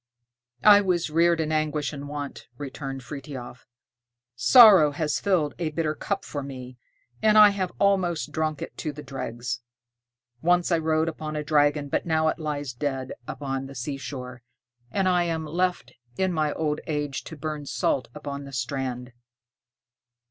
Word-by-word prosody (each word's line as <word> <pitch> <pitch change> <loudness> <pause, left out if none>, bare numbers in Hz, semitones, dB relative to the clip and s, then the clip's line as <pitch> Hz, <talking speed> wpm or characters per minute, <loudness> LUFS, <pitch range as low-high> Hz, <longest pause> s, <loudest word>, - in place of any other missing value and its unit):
"I 205 -1 +8
was 175 -5 0
reared 170 +1 +3
in 155 -1 -1
anguish 155 -1 0
and 140 0 -7
want," 145 -1 -6
returned 135 -2 -6
Frithiof; 135 -3 -8 0.7
"sorrow 195 - +8
has 150 +1 -1
filled 175 -7 +1
a 165 -3 -1
bitter 155 0 -1
cup - - -3
for 145 - -4
me, 130 -2 -9 0.4
and 215 0 +5
I 210 -1 +10
have 190 -3 -2
almost 180 -6 +1
drunk 155 -1 -2
it - - -9
to 155 - -3
the 150 +1 -10
dregs. 125 -2 -5 0.8
Once 175 +1 +2
I 170 - +3
rode 160 0 +1
upon 155 -1 -4
a 150 - -2
dragon, 145 -1 +2
but 140 - -2
now 160 -1 +2
it - - -3
lies 145 -4 -3
dead 130 0 -3 0.2
upon 135 -1 -4
the 135 - -11
seashore, 125 -1 -6 0.5
and 190 +8 0
I 180 -1 +3
am 165 -2 -2
left 180 +4 -1 0.2
in 190 -1 +1
my 155 -2 +1
old 150 -2 -1
age 150 -3 -2
to 160 - -9
burn 150 -1 -5
salt 130 -3 0
upon 140 -1 -6
the 140 - -11
strand." 125 -1 -3
150 Hz, 160 wpm, -26 LUFS, 140-165 Hz, 0.8 s, I